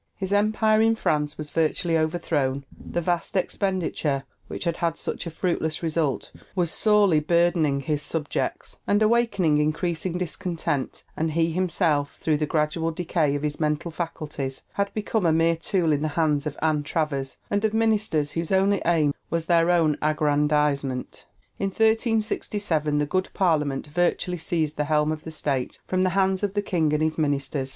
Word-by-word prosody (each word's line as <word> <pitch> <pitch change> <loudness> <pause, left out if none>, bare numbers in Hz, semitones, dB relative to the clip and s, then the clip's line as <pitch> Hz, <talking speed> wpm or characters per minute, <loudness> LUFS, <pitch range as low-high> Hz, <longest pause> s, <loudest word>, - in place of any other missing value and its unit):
His 190 0 -3
empire 215 +1 +3
in 225 0 +4
France 150 -8 0
was 150 -1 -7
virtually 165 +1 +1
overthrown; 155 -4 0
the 175 - -4
vast 175 +2 -1
expenditure 180 -7 -1 0.2
which - - -5
had 170 -2 -1
had 165 -1 -1
such - - -4
a - - -2
fruitless 160 -1 -2
result 160 -3 -1 0.2
was 175 -3 +1
sorely 205 -7 +4
burdening 165 -3 +2
his 145 +1 -1
subjects, 150 0 -3
and 205 +1 +3
awakening 210 -9 +2
increasing 165 +3 -1
discontent; 170 -5 -3
and 160 0 -1
he 165 +1 +2
himself, 165 -5 0
through 155 -2 +1
the 150 0 -1
gradual 155 +2 0
decay 160 -3 0
of 145 - -3
his 150 -1 -2
mental 155 +2 -1
faculties, 150 -5 -5
had 200 0 -1
become 215 0 -1
a - - +4
mere 165 +1 +3
tool 165 0 +1
in 145 - 0
the 155 - 0
hands 150 -2 +2
of 150 - -5
Anne 155 -2 +2
Travers, 145 -3 -2
and 205 +1 +1
of 220 - +2
ministers 215 -9 +1
whose 165 +2 -3
only 195 +1 +3
aim 155 -4 +3 0.2
was 165 -1 -1
their 170 0 +3
own 165 -4 +3
aggrandizement. 150 -3 0 0.3
In 195 - 0
1367 210 - +1
the 150 - +2
"Good 185 +5 -1
Parliament" 150 -7 +1
virtually 175 +2 0
seized 160 -2 -1
the 150 - 0
helm 150 0 +2
of 155 -1 -5
the 160 - -6
state 140 -5 -2
from 185 0 0
the 185 - +3
hands 190 -1 +2
of 205 -1 -2
the 205 - +1
king 165 -6 +1
and 150 +1 +1
his 155 +1 -1
ministers. 140 -2 -1
160 Hz, 170 wpm, -25 LUFS, 150-185 Hz, 0.3 s, in